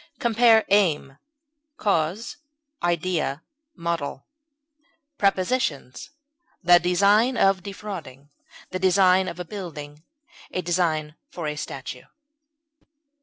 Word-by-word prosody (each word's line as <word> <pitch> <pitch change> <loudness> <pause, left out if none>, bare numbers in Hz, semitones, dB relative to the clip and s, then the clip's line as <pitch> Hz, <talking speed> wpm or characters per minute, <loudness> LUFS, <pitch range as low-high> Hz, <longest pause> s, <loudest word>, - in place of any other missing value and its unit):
Compare 230 -1 +4
AIM; 155 -9 +2 0.6
CAUSE; 195 +2 -1 0.4
IDEA; 170 -4 -1 0.3
MODEL. 170 -6 -3 0.9
Prepositions: 185 - 0 0.5
The 175 0 +7
design 200 +8 +3
of 195 -1 +3
defrauding; 175 -8 -8 0.4
the 185 - -3
design 185 0 +4
of 180 - -6
a 180 - -4
building; 155 -6 -8 0.5
a 185 - -3
design 165 -3 0 0.2
for 170 - -6
a 150 0 -2
statue. 130 -3 -7
175 Hz, 90 wpm, -24 LUFS, 155-195 Hz, 0.9 s, The